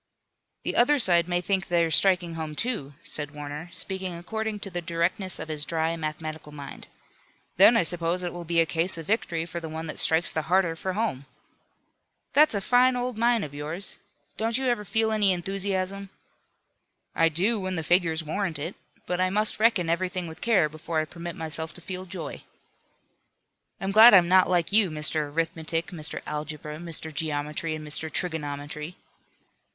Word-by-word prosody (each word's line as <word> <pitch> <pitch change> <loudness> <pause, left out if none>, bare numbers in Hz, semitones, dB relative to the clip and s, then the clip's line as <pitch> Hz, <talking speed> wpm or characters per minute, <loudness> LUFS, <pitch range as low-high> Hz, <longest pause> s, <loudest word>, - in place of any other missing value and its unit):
"The - - -2
other 290 +5 +5
side 175 - +4
may 175 0 +1
think 190 +1 0
they're 170 -2 +2
striking 180 -1 +3
home; 160 -2 -5
too," 150 - -3
said 145 0 -4
Warner, 150 +3 -7
speaking 190 -2 -4
according 220 +4 -4
to 195 - -5
the 175 0 -3
directness 170 +3 -1
of - - -6
his 155 -2 0
dry 160 +1 -1
mathematical 155 -1 -5
mind. 140 -2 -9 0.7
"Then 225 +5 +7
I - - +3
suppose 175 +1 0
it 175 - -3
will 175 0 -6
be 170 0 +1
a 165 - +5
case 165 +3 +2
of 165 - -7
victory 170 -5 -1
for 170 0 -5
the 165 -1 -7
one 160 +1 -5
that 155 - -2
strikes 160 0 +3
the 160 - -1
harder 180 -3 +3
for 185 +3 -3
home." 180 - -2 1.1
"That's 300 -5 +5
a 200 - -1
fine 250 +4 +4
old 245 -1 -2
mind 235 -2 +2
of 145 - -10
yours. 155 +6 -2 0.4
Don't 225 +1 0
you 265 - -2
ever 240 -3 0
feel 220 +2 0
any 210 -3 +3
enthusiasm?" 195 +1 -3 1.0
"I 165 -1 +3
do, 195 +8 +1
when 185 -1 -3
the 165 - -3
figures 165 -1 +2
warrant 165 +1 -2
it. 160 +6 -5 0.3
But 180 0 -1
I 185 - +2
must 210 +3 +1
reckon 220 -6 +3
everything 180 +1 -1
with 160 -1 -10
care 210 -9 +3
before 155 +1 -3
I 155 - 0
permit 170 +1 -7
myself 160 0 -4
to - - -10
feel 185 +1 -5
joy." 170 -6 -6 1.4
"I'm 195 +1 -2
glad 220 +2 +9
I'm 175 -2 +6
not 185 +1 +5
like 175 -1 +1
you, 205 -2 +5
Mr. 150 -1 -1
Arithmetic, 165 +1 -2
Mr. 160 -3 -4
Algebra, 150 0 -5
Mr. 160 -1 -2
Geometry 150 +1 -2
and 155 -1 -8
Mr. 155 +1 +1
Trigonometry." 150 -1 -3
170 Hz, 180 wpm, -26 LUFS, 160-195 Hz, 1.4 s, glad